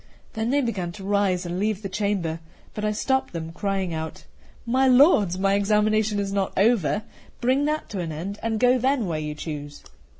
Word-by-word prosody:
Then 220 +1 -2
they 285 +2 +2
began 200 -9 -2
to 195 - -10
rise 195 -2 +1
and 175 +1 -3
leave 210 0 -1
the - - -2
chamber; 190 -5 -1 0.3
but 210 - -5
I 210 - +1
stopped 265 +4 0
them, 165 -1 -5
crying 190 0 -2
out: 160 0 -5 0.4
"My 260 +3 +2
lords, 250 - +5
my 195 +1 +2
examination 210 +1 +2
is 200 -1 -2
not 195 -1 -1
over; 210 -1 +2 0.4
bring 260 +4 +2
that 305 +1 -1
to 200 - -4
an 170 -2 -3
end, 185 +7 -5
and 225 -1 -1
go 250 +1 +4
then 260 -1 +1
where 165 -4 -2
you 150 -1 -4
choose." 145 -2 -7
200 Hz, 195 wpm, -24 LUFS, 180-225 Hz, 0.4 s, lords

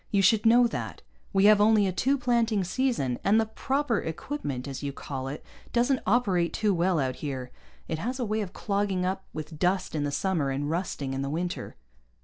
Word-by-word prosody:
You 200 -2 +2
should 215 +3 +4
know 240 +2 +6
that. 235 - -4 0.3
We 195 0 +3
have 210 0 +7
only 210 -1 +5
a 190 - +1
two 265 +9 +1
planting 235 -5 +1
season, 185 - 0
and 210 +3 +4
the 225 - +2
'proper 260 +2 -1
equipment,' 160 - -4
as 135 -1 -5
you 140 -1 -3
call 135 -1 -6
it, 140 +3 -6 0.3
doesn't 245 +2 +2
operate 190 -6 +2
too 210 -2 +1
well 175 0 +2
out 130 -2 -1
here. 130 -4 -5 0.4
It 160 - -3
has 245 +8 -3
a 245 - 0
way 215 +1 -1
of 195 -4 -5
clogging 200 -3 -1
up 190 +1 -2
with 155 0 -7
dust 185 +1 +1
in 150 -2 -1
the 145 - 0
summer, 165 -3 0
and 145 +2 -2
rusting 160 -6 -2
in 135 - -2
the 140 - -2
winter." 175 +4 -3
190 Hz, 205 wpm, -27 LUFS, 150-220 Hz, 0.4 s, have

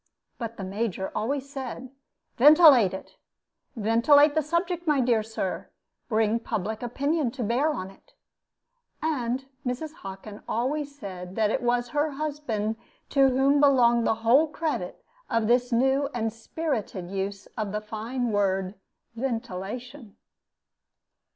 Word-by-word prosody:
But 230 -1 -5
the 195 - -5
Major 190 0 -3
always 275 +4 -2
said, 260 -2 -7 0.5
"Ventilate 285 - +7
it, 190 - -9 0.6
ventilate 235 +7 +5
the 315 - +2
subject, 340 +3 -2
my 295 -2 +3
dear 240 -3 +3
Sir; 215 -4 -4 0.4
bring 220 0 +2
public 220 -1 -3
opinion 280 +4 0
to 245 +1 -5
bear 245 +8 +1
on 190 -9 -5
it." - - -24 0.9
And 265 -4 -1 0.2
Mrs. 270 +5 -3
Hockin 195 +2 -9
always 285 +4 -2
said 185 -5 -8
that 220 -1 +2
it 265 - 0
was 240 0 0
her 295 +1 0
husband 275 -8 -3 0.3
to 275 -1 +5
whom 270 +2 +3
belonged 240 -5 +4
the - - +2
whole 270 +8 +5
credit 300 - -4 0.3
of 230 -3 +1
this 245 +2 +2
new 265 +4 +2
and 225 -2 -1
spirited 225 - -4
use 195 0 -4
of 215 -3 -3
the 210 - -1
fine 225 +3 -3
word 195 -2 0 0.4
"ventilation." 235 0 -5
240 Hz, 130 wpm, -26 LUFS, 215-280 Hz, 0.9 s, Ventilate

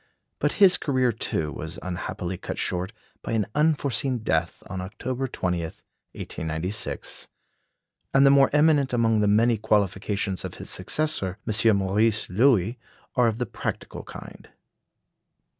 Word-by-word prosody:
But - - +1
his 190 -3 +6
career, 130 -4 +1
too, 80 -7 -2
was 80 +4 -7
unhappily 90 0 -4
cut - - -6
short 90 +1 -2 0.3
by - - -4
an 110 -3 +1
unforeseen 145 -4 +1
death 80 -3 -1
on 95 -1 -5
October 125 +7 -4
20, 90 -7 -2
1896; 80 +3 -6 0.8
and 135 +1 +5
the 140 - +7
more 140 -1 +6
eminent 150 -3 +3
among 115 -2 +3
the 105 - +2
many 110 +2 +3
qualifications 100 -1 0
of - - -6
his - - -8
successor, 125 - 0
M. 110 0 +4
Maurice 105 +3 +1
Loewy, 115 0 +3 0.4
are 125 -2 +3
of 110 -1 0
the 125 - -1
practical - - -5
kind. - - -11
110 Hz, 135 wpm, -25 LUFS, 95-130 Hz, 0.8 s, the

